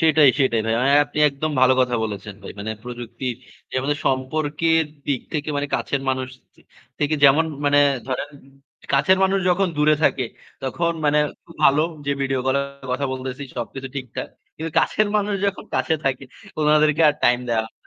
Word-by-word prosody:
সেটাই, 155 -3 +5
সেটাই, 120 -4 +2
ভাই। 115 - +1
আ - - +2 0.2
আপনি 145 +1 -8
একদম 145 +2 -3
ভালো 130 0 +6
কথা 125 -1 +1
বলেছেন 105 -1 -6
ভাই। - - -8
মানে, 105 +2 -4
প্রযুক্তির 120 +1 -5 0.4
যে - - -11
আমাদের 145 +2 -1
সম্পর্কের 155 +5 +1 0.2
দিক 140 -4 0
থেকে, 150 -1 -2
মানে 145 0 -1
কাছের 140 - -1
মানুষ 130 -1 -1 0.3
থ - - -35 0.4
থেকে 150 +1 +1
যেমন 145 +4 +6 0.2
মানে 145 0 +4 0.3
ধরেন, 130 +2 -3 0.6
কাছের 165 +8 +4
মানুষ 195 +1 +2
যখন 185 +2 +2
দূরে 150 +1 +4
থাকে, 130 - +2 0.4
তখন 170 +6 -1
মানে 150 0 +3 0.3
খুব 170 - -15
ভালো 140 +2 +5 0.3
যে - - +1
ভিডিও 135 -1 0
কলে 135 +1 +2 0.3
কথা 135 +2 -1
বলতেছি, 130 +1 -5
সবকিছু 130 +3 -5
ঠিকঠাক। 130 -3 -5 0.3
কিন্তু 160 +1 -4
কাছের 215 -1 +2
মানুষ 205 0 0
যখন 200 0 -3
কাছে 160 - +1
থাকে, 135 0 -1 0.3
ওনাদেরকে 150 +1 +3
আর 150 - +2
টাইম 120 0 +4
দেওয়া 115 -1 +1
হয় - - -7
না। - - -17
140 Hz, 180 wpm, -22 LUFS, 130-155 Hz, 0.6 s, ভালো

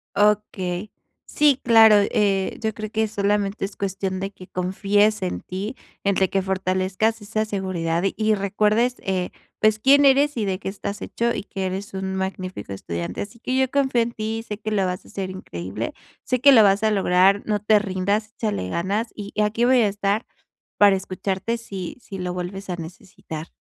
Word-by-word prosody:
Okey. 205 -2 0 0.3
Sí, 290 -3 +3
claro, 225 -2 +7
eh, 200 -1 +1
yo 220 -1 -1
creo 215 0 -6
que 220 0 0
solamente 205 -1 0
es 200 - -8
cuestión 190 -1 -3
de 195 +1 -3
que 185 -2 -13
confíes 200 +4 +1
en 185 -1 -3
ti, 200 +7 -5 0.3
en 200 -1 +2
de 190 -1 +2
que 195 - +1
fortalezcas 190 +3 0
esa 215 +1 -1
seguridad. 185 -5 -2
Y 215 0 +2
recuerdes, 210 +4 +1
eh, 185 -2 -2 0.3
pues, 215 0 +4
quién 280 +5 +6
eres, 280 +1 +4
y 215 - 0
de 190 -1 -1
qué 190 - -5
estás 200 +1 -6
hecho, 235 0 -1
y - - -4
que 195 -2 -4
eres 190 +2 -4
un 190 0 -3
magnífico 185 - -4
estudiante. 85 -3 -5
Así 205 +3 -8
que 255 +2 -2
yo 265 -1 +2
confío 265 -3 +2
en 235 +1 -5
ti, 220 0 -3
y - - -7
sé 210 -2 -6
que 215 0 -5
lo 200 -3 +1
vas 180 0 -3
a - - -17
hacer 190 -1 -4
increíble, 105 - -5 0.3
sé 255 - 0
que 280 +3 +7
lo 225 -4 +8
vas 200 0 +4
a 220 - +3
lograr, 195 0 +4
no 210 -1 0
te 210 +1 +4
rindas, 200 +2 -1
échale 210 - -2
ganas 200 - -1
y 205 -1 -8
aquí 215 +3 +1
voy 255 0 +5
a 215 - +4
estar 205 +2 -1 0.5
para 205 -1 +6
escucharte 190 +4 -3
si 195 -6 -7
si 195 -5 -9
lo 180 -1 -3
vuelves 185 +2 -6
a 180 - -1
necesitar. 165 -1 -8
200 Hz, 195 wpm, -23 LUFS, 185-215 Hz, 0.5 s, lo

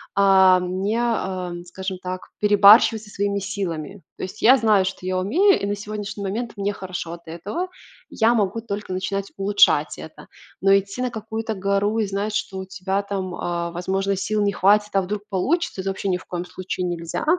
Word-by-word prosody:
а, 190 -2 +6
м, 180 +1 -3
не, 210 +4 0
эм, 185 -7 -2
скажем 185 +1 -6
так, 185 0 -6
перебарщивать 210 +2 +6
со 210 - -14
своими 200 0 -1
силами. 195 -3 -4 0.2
То - - -6
есть 185 +3 -7
я 255 +4 +7
знаю, 210 -5 +3
что 185 -1 -5
я 185 0 0
умею, 355 - +3
и - - -1
на 205 - -1
сегодняшний 205 -1 -6
момент 220 +4 -3
мне 200 +1 -1
хорошо 180 -3 -6
от 170 0 -12
этого. 200 - -4 0.4
Я 230 +1 +3
могу 215 0 0
только 205 -3 -5
начинать 195 +1 -3
улучшать 200 +1 +3
это. - - -11 0.3
Но 195 0 +5
идти 200 +5 -1
на 250 - -1
какую-то 220 +1 -4
гору 200 +2 0
и 210 - +1
знать, 200 +2 -2
что 190 - -3
у 190 - -5
тебя 190 +1 -2
там, 190 -3 -4
э, 170 -1 -3
возможно 190 +3 -1
сил 210 +2 -1
не 205 -1 +2
хватит- 205 +2 +3
"а 195 - +4
вдруг 205 +2 -4
получится?"- 210 - 0
это 195 - -2
вообще 195 0 -3
ни 180 - +1
в - - -14
коем 175 0 -4
случае 185 0 -4
нельзя. 170 -1 -4
195 Hz, 195 wpm, -22 LUFS, 185-210 Hz, 0.4 s, я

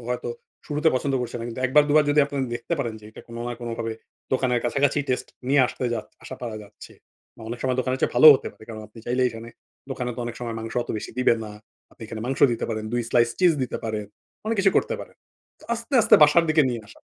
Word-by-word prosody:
ও - - -13
হয়তো 125 - -3 0.4
শুরুতে 150 +1 +1
পছন্দ 135 +1 0
করছে 120 0 -4
না। 115 - -5
কিন্তু 120 +2 -6
১ 130 - +1
বার 150 - +8
দুবার 150 +1 +5
যদি 145 0 +4
আপনারা 140 -1 -3
দেখতে 145 +8 -3
পারেন 120 -5 -2
যে 105 - -17
এটা - - -12
কোন 115 - -9
না - - -3
কোনভাবে 115 -1 -4 0.4
দোকানের 125 -2 +1
কাছাকাছি 140 +3 +1
টেস্ট 125 - -1 0.2
নিয়ে 140 0 +5
আসতে 125 - -5
যা 115 - -1 0.2
আসা 130 - -8
পারা 115 -3 -4
যাচ্ছে। 105 +1 -14 0.4
বা - - -13
অনেক 120 +1 -5
সময় 130 -1 0
দোকানের 130 +1 -1
চেয়ে - - +1
ভালোও 155 +5 +11
হতে - - -7
পারে। - - -16
কারণ 110 -1 -7
আপনি 115 - -16
চাইলে 125 +1 +1
এখানে 115 0 -9 0.4
দোকানে 125 -2 -3
তো - - -4
অনেক 120 0 -5
সময় 115 -2 -4
মাংস 115 0 -6
অত - - -16
বেশি - - -7
দিবে 125 -2 +4
না। 105 - -8 0.4
আপনি 115 - -15
এখানে 110 0 -7
মাংস 135 +1 -3
দিতে 115 - -3
পারেন, 110 -1 -3
২ 120 0 0
স্লাইস 120 -1 +3
চিজ 180 -2 +5
দিতে 125 - -3
পারেন, 110 -2 -3 0.4
অনেক 225 0 0
কিছু 195 0 +4
করতে - - +1
পারেন। - - -12 0.4
তো - - -17
আস্তে, 235 +4 -5
আস্তে - - +6
বাসার 150 +3 +6
দিকে 155 -1 +4
নিয়ে 115 -2 -4
আসা। - - -16
125 Hz, 245 wpm, -24 LUFS, 115-145 Hz, 0.4 s, ভালোও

